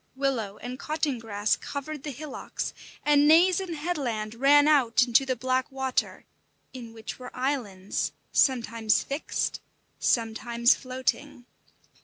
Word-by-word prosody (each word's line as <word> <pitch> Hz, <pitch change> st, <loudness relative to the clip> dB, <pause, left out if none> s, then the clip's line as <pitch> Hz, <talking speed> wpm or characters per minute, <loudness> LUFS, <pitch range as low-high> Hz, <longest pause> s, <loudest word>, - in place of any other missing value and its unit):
Willow 245 Hz, -7 st, -1 dB
and 250 Hz, +2 st, -7 dB
cotton 300 Hz, -4 st, -2 dB
grass 210 Hz, -2 st, 0 dB
covered 290 Hz, +1 st, -6 dB
the 295 Hz, -, -5 dB
hillocks, 290 Hz, +1 st, -5 dB, 0.3 s
and 295 Hz, 0 st, +5 dB
naze 345 Hz, +4 st, +6 dB
and 365 Hz, -4 st, -4 dB
headland 260 Hz, -10 st, -3 dB
ran 285 Hz, +4 st, +5 dB
out 260 Hz, -6 st, +4 dB
into 245 Hz, +2 st, +3 dB
the 255 Hz, -, 0 dB
black 255 Hz, +2 st, -1 dB
water, 265 Hz, -1 st, -2 dB, 0.5 s
in 240 Hz, -3 st, -9 dB
which 225 Hz, +1 st, -8 dB
were 250 Hz, 0 st, -8 dB
islands, 240 Hz, -8 st, -2 dB, 0.2 s
sometimes 230 Hz, -4 st, +2 dB
fixed, 280 Hz, +3 st, -2 dB, 0.4 s
sometimes 235 Hz, +1 st, +2 dB
floating. 255 Hz, 0 st, -3 dB
260 Hz, 125 wpm, -27 LUFS, 230-290 Hz, 0.5 s, naze